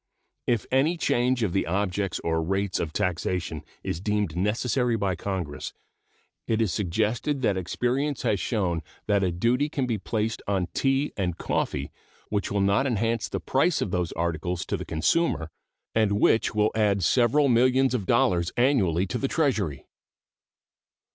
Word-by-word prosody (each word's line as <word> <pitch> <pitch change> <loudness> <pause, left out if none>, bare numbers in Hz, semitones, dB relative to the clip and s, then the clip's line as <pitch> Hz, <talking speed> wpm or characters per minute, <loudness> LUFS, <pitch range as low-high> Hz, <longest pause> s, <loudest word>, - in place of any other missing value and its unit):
If 115 -5 +1
any 145 +7 +2
change 125 -5 +1
of 95 -5 0
the 95 - 0
objects 95 +1 -1
or 80 -1 0
rates 95 +3 -1
of 80 - -2
taxation 90 -2 -2 0.2
is 80 - -3
deemed 105 -5 -1
necessary 115 +5 +1
by 100 -3 0
Congress, 90 -5 -4 0.7
it 110 -1 +1
is 110 -6 +1
suggested 110 - -1
that 100 - +2
experience 125 - -1
has 105 -5 +1
shown 90 -6 -1 0.2
that 100 -2 +2
a 90 - +1
duty 120 - +1
can 135 -3 -1
be 115 -4 -1
placed 110 +2 -2
on 95 -3 0
tea 135 +2 +1
and 90 -4 -2
coffee - - -2 0.4
which 105 -2 -1
will 100 0 +1
not 100 +8 +2
enhance 115 -1 0
the - - -3
price 150 +6 +1
of 90 - -2
those 90 -2 -1
articles 85 +1 -2
to - - -2
the - - -5
consumer, 80 - 0 0.4
and 110 -2 +2
which 110 +2 +2
will 105 0 +3
add 105 -3 +2
several 130 - +3
millions 130 +2 +3
of 105 -7 -2
dollars 85 -1 +2
annually 100 - +3
to 120 +6 -3
the 135 - 0
Treasury. 110 - 0
105 Hz, 160 wpm, -26 LUFS, 90-125 Hz, 0.7 s, will